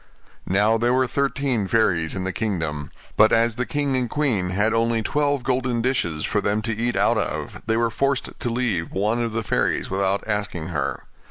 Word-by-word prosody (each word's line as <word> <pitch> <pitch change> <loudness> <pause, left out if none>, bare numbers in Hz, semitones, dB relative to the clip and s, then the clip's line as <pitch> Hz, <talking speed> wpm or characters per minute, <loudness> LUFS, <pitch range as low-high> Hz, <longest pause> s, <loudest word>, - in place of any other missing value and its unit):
Now 105 +4 +3
there 120 +2 +2
were 130 0 +3
thirteen 135 -5 0
fairies 90 -7 +1
in 95 - -3
the 95 0 -2
kingdom; 80 -9 -2 0.3
but 110 +1 +6
as 115 0 +3
the 125 +1 -2
king 145 -2 0
and 125 -2 0
queen 125 -12 0
had 105 +4 +1
only 115 0 +1
twelve 145 +1 0
golden 125 -1 0
dishes 85 - 0
for 105 - 0
them 105 +2 0
to 115 0 -2
eat 120 +2 -1
out - - +3
of, - - -4
they 115 0 +2
were 115 -1 +1
forced 140 +1 0
to 120 - -2
leave 115 -9 -1
one 105 +5 0
of 115 -1 -1
the 115 0 -1
fairies - - 0
without 95 +1 +1
asking 100 -6 -2
her. 70 -5 -2
115 Hz, 195 wpm, -23 LUFS, 95-125 Hz, 0.3 s, but